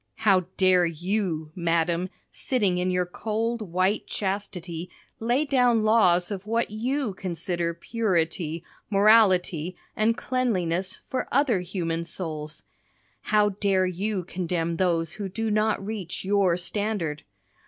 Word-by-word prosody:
How 195 Hz, -5 st, +3 dB
dare 185 Hz, -2 st, +4 dB
you, 170 Hz, -2 st, -2 dB
madam, 170 Hz, +1 st, 0 dB, 0.2 s
sitting 200 Hz, -9 st, 0 dB
in 180 Hz, +1 st, 0 dB
your 180 Hz, 0 st, +1 dB
cold, 225 Hz, +5 st, -2 dB
white 185 Hz, +1 st, 0 dB
chastity, 185 Hz, -4 st, -4 dB, 0.3 s
lay 245 Hz, +6 st, +1 dB
down 245 Hz, -5 st, +3 dB
laws 185 Hz, -5 st, +4 dB
of 200 Hz, 0 st, -5 dB
what 230 Hz, 0 st, 0 dB
you 245 Hz, +1 st, -1 dB
consider 175 Hz, -2 st, -2 dB
purity, 170 Hz, -5 st, -1 dB, 0.3 s
morality, 195 Hz, -5 st, +4 dB, 0.2 s
and 225 Hz, +2 st, +2 dB
cleanliness, 190 Hz, -8 st, -1 dB
for 260 Hz, -, -2 dB
other 260 Hz, -6 st, +3 dB
human 170 Hz, -2 st, -2 dB
souls? 155 Hz, -3 st, -5 dB, 0.6 s
How 210 Hz, -1 st, +3 dB
dare 195 Hz, -2 st, +1 dB
you 185 Hz, +2 st, -2 dB
condemn 170 Hz, -2 st, -2 dB
those 165 Hz, -3 st, +1 dB
who 200 Hz, 0 st, -5 dB
do 225 Hz, +3 st, -2 dB
not 215 Hz, -1 st, +1 dB
reach 195 Hz, -5 st, -5 dB
your 195 Hz, -3 st, +3 dB
standard? 180 Hz, -4 st, -2 dB
185 Hz, 120 wpm, -26 LUFS, 170-215 Hz, 0.6 s, dare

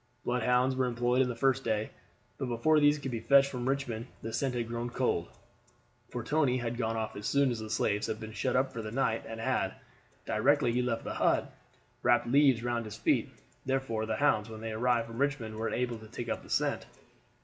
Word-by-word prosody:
Bloodhounds 125 Hz, +1 st, +2 dB
were 130 Hz, -1 st, +1 dB
employed 120 Hz, +2 st, +2 dB
the 120 Hz, -, -3 dB
first 135 Hz, +2 st, +2 dB
day, 110 Hz, -1 st, -1 dB, 0.5 s
but 135 Hz, -, -2 dB
before 140 Hz, +7 st, +3 dB
these 145 Hz, 0 st, +5 dB
could 135 Hz, -3 st, -5 dB
be 115 Hz, -, -2 dB
fetched 140 Hz, +4 st, +5 dB
from 125 Hz, 0 st, -2 dB
Richmond 130 Hz, -4 st, -2 dB, 0.2 s
the 115 Hz, -, -5 dB
scent 130 Hz, +1 st, -1 dB
had 120 Hz, -2 st, -1 dB
grown 120 Hz, +1 st, -3 dB
cold; 120 Hz, -9 st, 0 dB, 0.8 s
for 120 Hz, -, -4 dB
Tony 140 Hz, -1 st, +2 dB
had 120 Hz, -1 st, -3 dB
gone 115 Hz, -1 st, -1 dB
off 110 Hz, -1 st, -3 dB
as 105 Hz, +2 st, -4 dB
soon 140 Hz, -2 st, +3 dB
as 120 Hz, -, -3 dB
the 110 Hz, 0 st, -6 dB
slaves 105 Hz, -1 st, 0 dB
had 110 Hz, -1 st, -3 dB
been 110 Hz, -1 st, -7 dB
shut 125 Hz, +3 st, -1 dB
up 130 Hz, +1 st, +1 dB
for 115 Hz, -, -4 dB
the 110 Hz, -, -5 dB
night 115 Hz, -1 st, 0 dB
and 115 Hz, 0 st, -6 dB
had, 115 Hz, -, 0 dB, 0.5 s
directly 120 Hz, +3 st, +3 dB
he 125 Hz, +1 st, +1 dB
left 115 Hz, -2 st, -1 dB
the -, -, -4 dB
hut, -, -, +1 dB, 0.5 s
wrapped -, -, +3 dB
leaves 135 Hz, -2 st, +4 dB
round 120 Hz, -1 st, -1 dB
his 110 Hz, 0 st, -7 dB
feet, -, -, +1 dB, 0.3 s
therefore 130 Hz, -5 st, -1 dB
the -, -, 0 dB
hounds, 115 Hz, -7 st, +2 dB
when 110 Hz, -1 st, -8 dB
they 115 Hz, 0 st, -4 dB
arrived 120 Hz, +1 st, +1 dB
from 115 Hz, +1 st, -8 dB
Richmond, 135 Hz, -6 st, -1 dB
were 110 Hz, +1 st, -2 dB
unable 120 Hz, -2 st, -2 dB
to 110 Hz, -, -12 dB
take 115 Hz, +2 st, -6 dB
up -, -, -2 dB
the -, -, -15 dB
scent. -, -, 0 dB
120 Hz, 215 wpm, -31 LUFS, 115-130 Hz, 0.8 s, these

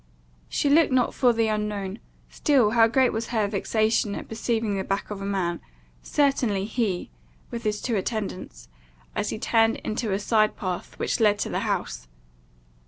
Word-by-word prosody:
She -, -, 0 dB
looked 300 Hz, +1 st, +5 dB
not 255 Hz, -2 st, +2 dB
for 250 Hz, -2 st, +4 dB
the 225 Hz, -1 st, +1 dB
unknown, 210 Hz, -2 st, -2 dB, 0.3 s
still 260 Hz, -8 st, +2 dB
how 225 Hz, -1 st, +5 dB
great 255 Hz, +2 st, +3 dB
was 225 Hz, +1 st, -2 dB
her 220 Hz, -3 st, 0 dB
vexation 215 Hz, +1 st, 0 dB
at -, -, -7 dB
perceiving 225 Hz, -2 st, -1 dB
the 190 Hz, -, -1 dB
back 195 Hz, +2 st, -3 dB
of 200 Hz, -1 st, -5 dB
a -, -, -4 dB
man, 185 Hz, -4 st, -1 dB, 0.4 s
certainly 245 Hz, -9 st, +1 dB
he, 215 Hz, -5 st, -2 dB, 0.4 s
with 235 Hz, -1 st, -4 dB
his 210 Hz, -2 st, -1 dB
two 235 Hz, -, -1 dB
attendants, 195 Hz, -, -4 dB, 0.5 s
as -, -, -1 dB
he -, -, -3 dB
turned 225 Hz, 0 st, +2 dB
into 215 Hz, 0 st, -2 dB
a 190 Hz, -, +1 dB
side 215 Hz, +1 st, +2 dB
path 185 Hz, -4 st, -5 dB
which -, -, -1 dB
led 210 Hz, -2 st, +4 dB
to -, -, -2 dB
the -, -, -1 dB
house! -, -, -3 dB
215 Hz, 170 wpm, -25 LUFS, 200-235 Hz, 0.5 s, looked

